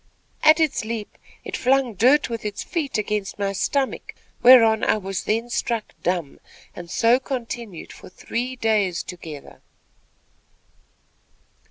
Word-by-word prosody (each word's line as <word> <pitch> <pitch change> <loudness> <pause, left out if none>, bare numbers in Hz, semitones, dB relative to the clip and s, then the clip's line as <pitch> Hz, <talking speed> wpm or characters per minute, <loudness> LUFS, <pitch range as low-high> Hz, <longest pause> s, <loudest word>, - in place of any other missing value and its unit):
At 310 +1 +6
its 315 -7 +1
leap, 220 -1 -5 0.3
it - - -4
flung 260 -2 +2
dirt 255 +9 +4
with 230 -2 -5
its 210 -1 -4
feet 305 -9 -2
against 210 -1 -2
my 200 -1 -1
stomach, 270 +7 -2 0.3
whereon, 230 -3 +7
I - - +3
was 195 -3 -5
then 225 +2 0
struck 230 -2 -2
dumb, 175 -5 -2 0.4
and 175 -1 -9
so 235 +6 +3
continued 235 - -6
for - - -13
three 245 +7 -4
days 210 -7 0
together." 160 -5 -10
225 Hz, 130 wpm, -23 LUFS, 195-255 Hz, 0.4 s, whereon